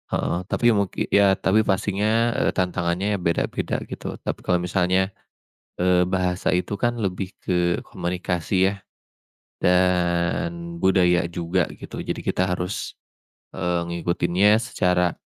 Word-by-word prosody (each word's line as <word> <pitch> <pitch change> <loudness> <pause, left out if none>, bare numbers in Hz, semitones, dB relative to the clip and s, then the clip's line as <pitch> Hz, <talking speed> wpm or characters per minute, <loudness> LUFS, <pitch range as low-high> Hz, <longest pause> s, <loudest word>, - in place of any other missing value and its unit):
heeh, - - -1
tapi 120 +2 +3
mungki 100 -4 -1
ya, 100 -1 +5
tapi 100 +2 +2
pastinya, 105 +4 +1
eee, - - +2
tantangannya 90 +2 0
beda-beda 85 -2 -1
gitu, - - -7
tapi - - -3
kalau 90 -1 +2
misalnya, 95 +1 +1 0.7
eee, 90 0 +4
bahasa 90 0 0
itu, 90 +3 -1
kan, 120 +2 +1
lebih 95 -1 -3
ke 90 -1 0
komunikasi, 90 +1 0
ya, - - -3 0.9
dan 90 - +1
budaya 90 -2 +3
juga 85 +1 0 0.2
gitu - - -7
jadi - - -3
kita 95 - 0
harus, 90 +1 -2 0.6
eee, 85 -1 -1
mengikutinya 85 +4 +2
secara, 90 -7 +1
90 Hz, 120 wpm, -23 LUFS, 90-100 Hz, 0.9 s, ya